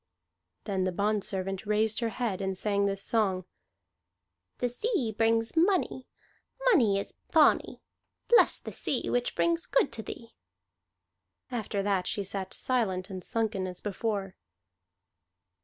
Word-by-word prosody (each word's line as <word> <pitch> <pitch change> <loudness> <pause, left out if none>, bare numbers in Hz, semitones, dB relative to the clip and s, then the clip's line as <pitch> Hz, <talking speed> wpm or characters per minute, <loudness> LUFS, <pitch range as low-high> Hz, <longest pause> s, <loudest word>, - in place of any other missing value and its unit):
Then 195 -3 -1
the 185 - 0
bondservant 195 0 -2
raised 215 +1 +2
her 230 -2 0
head 225 -5 -2
and 190 -1 -2
sang 200 0 +1
this 195 0 -1
song: 195 -5 +1 1.1
"The 245 - 0
sea 245 - -1
brings 225 +2 +2
money; 335 -6 +2 0.6
Money 245 - +5
is 200 - -4 0.2
bonny. 315 -2 +3 0.4
Bless 480 0 +5
then - - -8
the - - -9
sea 260 - -1
Which 245 0 0
brings 335 0 +1
good 275 - +2
to 220 - -4
thee." 230 +1 -9 1.2
After 215 -4 -2
that 195 -2 0
she 205 - -1
sat 190 -1 -4
silent 200 -7 -1
and 185 -1 -6
sunken 220 -4 -1
as 180 -1 -6
before. 200 -2 -3
215 Hz, 135 wpm, -29 LUFS, 195-240 Hz, 1.2 s, Money